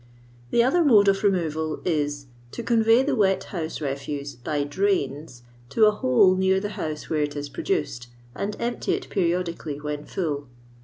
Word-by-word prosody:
The 235 - +4
other 335 +8 +3
mode 215 -9 +6
of 195 0 +1
removal 160 -5 0
is, 145 -4 -1 0.3
to 235 - -5
convey 225 +2 +4
the 280 0 0
wet 195 -4 +2
house 165 -4 -5
refuse, 140 0 -4
by 145 +4 -2
drains, 145 -6 -1 0.3
to 220 - +4
a 210 - +6
hole 210 -4 +4
near 190 0 +2
the 205 +1 -3
house 155 -7 -5
where 155 -1 0
it 145 0 -2
is 145 0 -5
produced, 335 - -2 0.3
and 205 +8 -3
empty 240 0 -1
it - - -8
periodi 175 -2 0
cally 145 -2 -6
when 150 0 -5
full. 145 -6 -3
175 Hz, 170 wpm, -25 LUFS, 145-210 Hz, 0.3 s, mode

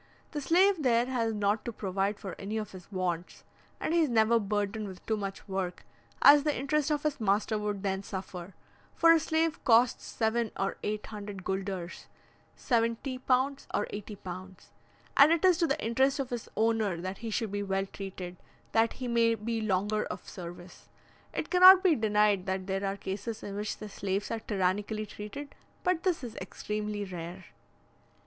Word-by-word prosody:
The 295 - -3
slave 360 +4 +4
there 240 -3 +3
has 240 -3 0
not 210 0 0
to 235 - -4
provide 200 0 -2
for 195 - -6
any 205 +3 -3
of 215 -1 -4
his 185 +1 -12
wants, 180 -2 -3 0.4
and 315 - -1
he 340 - +4
is 315 -4 +3
never 230 0 +4
burdened 205 0 -2
with 185 -2 -10
too 220 - +1
much 195 -1 -5
work, 190 -2 -3 0.4
as 290 +1 +9
the 295 0 0
interest 285 +3 0
of 295 -1 0
his 300 -2 -1
master 210 +1 +1
would 210 -1 -3
then 190 -1 -1
suffer; 185 -2 -7 0.4
for 330 - +6
a 330 - +6
slave 320 0 0
costs 235 0 +4
seven 225 0 0
or 195 - -1
eight 210 0 -3
hundred 205 -3 -7
gulders 190 -2 -4 0.5
(70 235 +2 0 0.5
or 210 - 0
80 205 0 -6
pounds), 185 0 -9 0.4
and 285 +3 +8
it 335 +2 +3
is 360 -2 +5
to 335 - +3
the 290 +2 0
interest 265 +4 +2
of 270 -3 -3
his 240 -2 -4
owner 220 -5 +1
that 185 +2 -5
he 230 - -5
should 220 -1 -1
be 205 0 -2
well 195 -1 -1
treated, 190 -2 -7 0.3
that 225 0 +3
he 255 - -5
may 230 -1 +3
be 225 +1 -3
longer 210 +1 0
of - - -7
service. 175 -1 -10 0.4
It - - -4
cannot 370 +1 +9
be 370 -4 +5
denied 210 -5 +2
that 190 0 -2
there 195 +1 -2
are 195 0 -1
cases 205 +4 -5
in 200 - -5
which 210 +1 -3
the 215 - -7
slaves 200 0 -3
are 230 - -1
tyrannically 205 +1 -1
treated, 215 +8 -8 0.3
but 360 -2 +1
this 360 -6 0
is 235 -2 -6
extremely 210 -1 -4
rare. 175 0 -7
210 Hz, 180 wpm, -30 LUFS, 195-245 Hz, 0.5 s, as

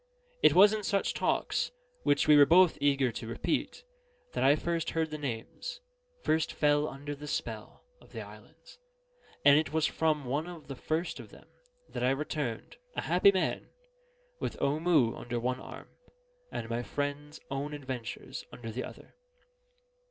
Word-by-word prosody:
It - - +6
was 205 +3 +8
in 215 - -1
such 200 0 0
talks, - - 0 0.3
which 145 +1 +2
we 150 - +8
were 145 -1 +8
both 180 +2 +6
eager 140 -3 +3
to 115 0 -6
repeat, 115 - -2 0.5
that - - -1
I 140 +2 +6
first 165 +1 -1
heard 160 -1 -1
the 155 - -3
names 140 - -5 0.4
first 160 0 +1
fell 145 0 +3
under 145 +1 -6
the 145 +1 -9
spell 110 -6 -5 0.2
of - - -19
the - - -6
islands; - - -15 0.7
and 145 +1 +8
it 155 - -2
was 160 0 +2
from 155 -3 +1
one 145 +6 -1
of 170 -3 -10
the 135 - -4
first 160 +6 -2
of - - -10
them - - -16 0.4
that - - -4
I 125 - +4
returned 135 -4 -3 0.2
(a - - -1
happy 180 +3 +5
man) 190 -2 -1 0.7
with - - -4
Omoo 150 -4 +2
under 120 0 -4
one 125 +2 -1
arm, - - -10 0.6
and 115 - -4
my 115 +1 -2
friend's 145 +3 -4
own 140 +2 -2
adventures 130 -5 -6
under 115 -2 -7
the 125 +4 -4
other. - - -11
145 Hz, 165 wpm, -30 LUFS, 130-160 Hz, 0.7 s, was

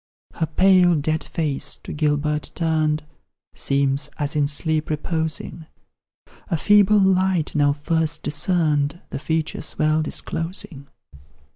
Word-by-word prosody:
Her 160 - -2
pale 180 +1 +4
dead 155 +2 -1
face, 150 -4 -2
to - - -6
Gilbert 150 -1 0
turned, 155 -2 0 0.5
Seems 140 0 0
as 145 +1 -3
in 145 -1 +2
sleep 155 +1 -1
reposing; 160 +1 -3 0.8
A 170 - 0
feeble 205 +3 +5
light, 190 -4 +2
now 145 -1 +3
first 160 +1 -1
discerned, 150 -1 0
The - - -4
features 160 0 -3
well 155 +1 +2
disclosing. 165 -2 -4
155 Hz, 115 wpm, -22 LUFS, 150-165 Hz, 0.8 s, feeble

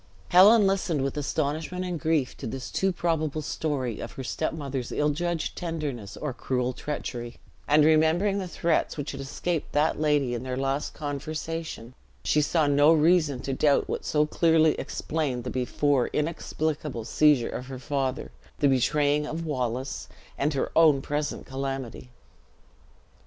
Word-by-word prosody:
Helen 205 +4 +7
listened 185 -7 +1
with 135 +1 -2
astonishment 155 +5 -2
and 175 -3 -3
grief 155 -5 0
to - - -6
this 130 +3 -6
too 195 0 +1
probable 155 -3 -1
story 135 -8 -2
of - - -6
her 135 - -6
step 155 +5 -2
mother's 135 -5 -4
ill 150 0 +1
judged 170 +1 -2
tenderness 150 - -4
or 150 -4 -3
cruel 125 0 -1
treachery; 120 -4 -5 0.3
and 150 +1 +5
remembering 160 +6 +3
the 185 - -4
threats 170 -2 0
which 145 -1 -3
had - - -6
escaped 155 +4 -3
that 150 +1 +2
lady 145 -5 +2
in 120 - -3
their 130 0 -4
last 135 +2 -2
conversation, 155 -3 -5 0.3
she 150 - +3
saw 155 +1 +2
no 145 +2 +5
reason 155 -4 +3
to 135 - -3
doubt 145 +1 +2
what - - -3
so 150 0 +2
clearly 160 0 +3
explained 145 -6 -2
the 125 - -4
before 130 +1 +1
inexplicable 150 -5 -2
seizure 145 -2 +3
of 125 - -6
her 135 -1 -6
father, 135 0 -2 0.3
the 145 - +3
betraying 145 +3 +2
of 165 +2 -4
Wallace, 130 -3 -3 0.3
and 145 +1 0
her 135 - -1
own 155 -4 +5
present 145 0 -3
calamity. 135 -2 -5
150 Hz, 155 wpm, -27 LUFS, 135-160 Hz, 0.3 s, Helen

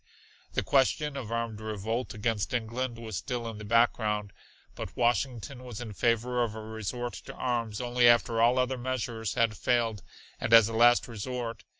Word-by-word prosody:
The - - 0
question 140 +2 +2
of 125 -5 -5
armed 115 -2 -3
revolt 110 +3 -3
against 110 +1 -1
England 120 +1 -2
was 110 -5 -5
still 120 -2 -3
in 110 -2 -6
the - - -7
background, 105 -2 +1 0.4
but - - -7
Washington 125 +1 0
was 120 -4 -7
in 115 -3 -6
favor 120 +3 +1
of 110 -2 -3
a 110 - -6
resort 110 +3 -4
to - - -9
arms 115 -4 -2
only 120 0 +3
after 115 -1 +3
all 120 +2 +4
other 130 0 0
measures 120 -3 -3
had 115 -2 +2
failed 115 -3 0 0.4
and - - -1
as 115 -2 +9
a 115 - -5
last 120 +2 +5
resort. 120 +1 -5
115 Hz, 175 wpm, -29 LUFS, 110-125 Hz, 0.4 s, as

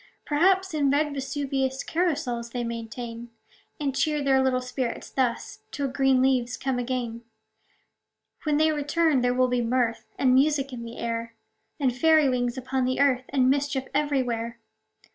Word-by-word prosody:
Perhaps, 375 +4 +2
in 290 -3 +2
red 295 +1 +1
Vesuvius 270 -1 -2
Carousals 295 -9 -1
they 245 -1 -2
maintain; 230 0 -6 0.5
And 280 -3 -1
cheer 300 +1 +1
their 270 -1 +3
little 260 -1 +2
spirits 250 -1 -4
thus, 250 -3 -1
Till 280 -1 -2
green 265 -1 +3
leaves 250 -2 +1
come 265 -2 -1
again. 240 -2 -3 1.2
When 300 -2 +1
they 315 +1 +4
return, 295 -1 +1
there 245 0 +1
will 255 0 +3
be 250 -1 0
mirth 235 -1 0
And 255 -2 +3
music 275 0 +2
in 240 - -6
the 230 0 -9
air, 230 0 -4 0.4
And 260 -4 +1
fairy 315 +2 +4
wings 245 -1 0
upon 260 0 -1
the 255 0 -1
earth, 260 -2 +3
And 260 -2 +2
mischief 275 0 +1
everywhere. 245 -5 -1
260 Hz, 155 wpm, -26 LUFS, 245-285 Hz, 1.2 s, they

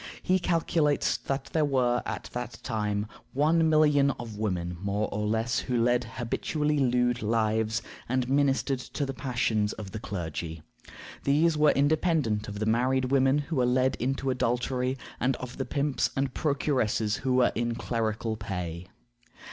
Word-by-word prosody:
He 185 +1 +3
calculates 165 -6 +1
that 135 +4 -3
there 160 - +3
were 125 -4 +2
at - - -5
that 120 -2 -5
time 105 -3 -1 0.3
one 160 +4 +3
million 150 -3 +4
of 115 -3 -7
women, 90 -5 -2
more 100 +1 -1
or 105 0 -1
less, 115 +2 0
who 125 -2 -1
led 120 +1 +2
habitually 150 +5 -1
lewd 125 -2 +2
lives, 110 0 +1 0.3
and 130 0 0
ministered 135 -1 +2
to 140 +3 -4
the 135 - -4
passions 120 -5 0
of 105 -3 -8
the 110 - -5
clergy. 80 -4 -5 0.6
These 155 +4 +3
were 150 0 +5
independent 145 -7 +2
of 105 -1 -6
the 110 - -1
married 130 +3 +1
women 135 0 +4
who 150 +1 -3
were 125 - +3
led 130 +1 +2
into 135 +1 -1
adultery, 125 +1 0 0.2
and 130 +1 +1
of 125 0 -8
the 135 - -2
pimps 145 -1 0
and 135 0 0
procuresses 130 -7 0
who 130 -1 0
were 125 -1 +4
in 120 0 -1
clerical 110 -2 -2
pay. 90 -4 -5
125 Hz, 155 wpm, -28 LUFS, 110-140 Hz, 0.6 s, were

